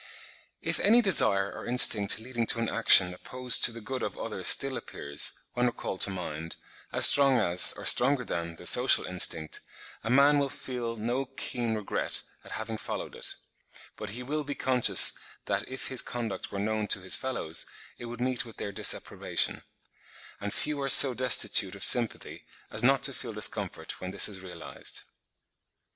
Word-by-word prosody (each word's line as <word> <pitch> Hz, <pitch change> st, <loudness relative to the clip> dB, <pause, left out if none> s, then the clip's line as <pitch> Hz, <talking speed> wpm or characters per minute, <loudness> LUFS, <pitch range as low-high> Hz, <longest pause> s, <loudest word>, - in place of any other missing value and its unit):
If -, -, -1 dB
any 230 Hz, +4 st, +4 dB
desire 100 Hz, -, +3 dB
or -, -, -10 dB
instinct 115 Hz, -4 st, +5 dB
leading 120 Hz, 0 st, -5 dB
to 115 Hz, -, +2 dB
an 115 Hz, -, -2 dB
action 95 Hz, -5 st, +3 dB
opposed 125 Hz, +6 st, -1 dB
to -, -, +3 dB
the 115 Hz, 0 st, -11 dB
good 130 Hz, +3 st, -7 dB
of -, -, -6 dB
others -, -, -5 dB
still -, -, +2 dB
appears, 70 Hz, +1 st, -1 dB, 0.2 s
when 125 Hz, 0 st, -1 dB
recalled 105 Hz, -5 st, -6 dB
to -, -, +6 dB
mind, 85 Hz, -4 st, -7 dB, 0.4 s
as -, -, +4 dB
strong 135 Hz, -3 st, +4 dB
as, 90 Hz, -4 st, +2 dB
or -, -, -11 dB
stronger 125 Hz, 0 st, +3 dB
than, 85 Hz, -3 st, -6 dB
the 90 Hz, -, -14 dB
social 125 Hz, +7 st, +4 dB
instinct, 85 Hz, -3 st, -2 dB, 0.4 s
a 115 Hz, -, -5 dB
man 140 Hz, +3 st, +3 dB
will 140 Hz, -1 st, -2 dB
feel 125 Hz, -4 st, -7 dB
no 120 Hz, +5 st, -4 dB
keen 125 Hz, -3 st, -4 dB
regret 105 Hz, -2 st, -4 dB, 0.2 s
at -, -, -12 dB
having -, -, -7 dB
followed -, -, -7 dB
it; -, -, -3 dB, 0.6 s
but 105 Hz, -, -8 dB
he 120 Hz, +5 st, -8 dB
will 150 Hz, +4 st, -4 dB
be 145 Hz, 0 st, -7 dB
conscious 130 Hz, -2 st, +4 dB, 0.3 s
that -, -, -4 dB
if 130 Hz, 0 st, -5 dB
his 130 Hz, -, -3 dB
conduct 120 Hz, -4 st, -7 dB
were 100 Hz, -, -7 dB
known 105 Hz, +1 st, -3 dB
to 95 Hz, -, +2 dB
his 95 Hz, -, +3 dB
fellows, 105 Hz, -11 st, -3 dB, 0.3 s
it 120 Hz, -, -9 dB
would 120 Hz, 0 st, -9 dB
meet 125 Hz, 0 st, -2 dB
with 115 Hz, -2 st, -15 dB
their 100 Hz, -, -6 dB
disapprobation; 100 Hz, -, -1 dB, 0.8 s
and 105 Hz, -, -6 dB
few 150 Hz, +5 st, -4 dB
are 135 Hz, -, -3 dB
so 135 Hz, 0 st, +8 dB
destitute 125 Hz, +1 st, +2 dB
of -, -, -4 dB
sympathy 120 Hz, -2 st, +2 dB, 0.3 s
as 110 Hz, -, -1 dB
not 135 Hz, +2 st, +1 dB
to -, -, +2 dB
feel -, -, -8 dB
discomfort -, -, -3 dB
when 90 Hz, -, -6 dB
this 100 Hz, +1 st, +6 dB
is 100 Hz, -3 st, -8 dB
realised. 90 Hz, -3 st, -8 dB
120 Hz, 180 wpm, -27 LUFS, 100-130 Hz, 0.8 s, so